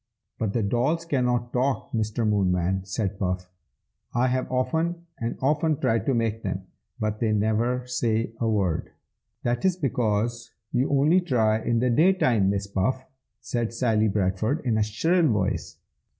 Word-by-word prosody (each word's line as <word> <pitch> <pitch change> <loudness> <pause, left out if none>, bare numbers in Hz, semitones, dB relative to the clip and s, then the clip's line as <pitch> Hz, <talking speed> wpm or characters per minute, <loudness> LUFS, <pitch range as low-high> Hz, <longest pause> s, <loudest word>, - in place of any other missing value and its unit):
"But 105 -3 -1
the 115 - 0
dolls 130 +11 0
cannot 125 -5 0
talk, 130 +2 0
Mr. 110 0 -1
Moonman!" 95 -2 +1
said 95 0 -2
Puff. 90 -1 -2 0.6
"I 125 +1 +3
have 130 0 -1
often 160 +7 -1
and 115 0 -3
often 150 +2 +2
tried 115 +4 +1
to 135 - +2
make 115 -1 0
them, 95 -2 -4 0.3
but 105 0 -2
they 110 -2 +1
never 110 +4 +1
say 115 -3 0
a 115 - +1
word." 95 -7 0 0.5
"That 120 +6 -1
is 190 -2 +3
because 120 - -1 0.2
you 130 +1 +1
only 150 +6 +4
try 110 -9 +1
in 115 - 0
the 125 +1 +2
day 170 +10 +5
time, 115 - +2
Miss 100 0 -1
Puff!" 105 +7 -1 0.4
said 115 0 -2
Sally 110 -3 +2
Bradford, 105 - 0
in 110 -3 +2
a - - +2
shrill 160 - +2
voice. 105 -7 -1
115 Hz, 160 wpm, -25 LUFS, 105-130 Hz, 0.6 s, day